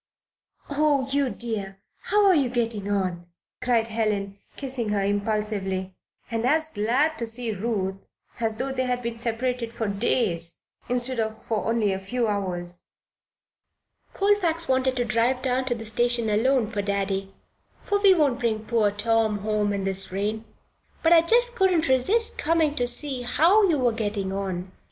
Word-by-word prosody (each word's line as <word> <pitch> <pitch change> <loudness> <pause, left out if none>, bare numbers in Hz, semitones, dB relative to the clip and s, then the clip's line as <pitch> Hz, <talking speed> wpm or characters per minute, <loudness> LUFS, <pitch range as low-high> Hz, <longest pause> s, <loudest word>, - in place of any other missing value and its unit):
"Oh, 285 -2 +1
you 280 -1 +1
dear! 210 -6 -3 0.3
How 415 +1 +3
are 385 - +6
you 280 -7 +2
getting 230 -4 -2
on?" 185 -4 -2 0.3
cried 235 -3 +2
Helen, 205 -3 -2 0.2
kissing 255 -5 -4
her 205 -1 0
impulsively 200 -2 -2 0.4
and 225 0 -1
as 315 +5 +1
glad 255 +10 +1
to 235 - -2
see 230 0 -4
Ruth 195 -2 -2 0.4
as 220 -2 -1
though 265 +3 -2
they 260 -1 -1
had 250 0 -1
been 235 0 -3
separated 235 0 -2
for 225 -2 -3
days 200 -5 +1 0.3
instead 250 0 +1
of 220 0 -3
for 220 -2 -2
only 220 -4 +1
a 190 - -3
few 235 +5 -2
hours. 180 -4 -3 1.3
"Colfax 360 -5 +1
wanted 260 0 +1
to 245 -1 0
drive 235 +3 +1
down 255 0 0
to 245 -2 -1
the 225 -1 -8
station 235 0 +1
alone 235 +1 +2
for 205 - -1
Daddy 195 -1 -2 0.5
for 405 - +1
we 395 -2 +6
won't 280 -7 +2
bring 220 -2 -1
poor 220 -2 +2
Tom 220 +1 +1
home 210 0 0
in 200 -1 -2
this 195 0 -2
rain 210 +3 -2 0.6
but 330 +1 +5
I 330 - +7
just 480 +7 +3
couldn't 370 -6 +2
resist 380 - +2
coming 320 -1 +2
to 245 -4 0
see 260 +1 +1
how 360 - +4
you 315 - +2
were 250 -3 +2
getting 205 -3 -3
on." 190 -2 -4
230 Hz, 165 wpm, -25 LUFS, 205-265 Hz, 1.3 s, I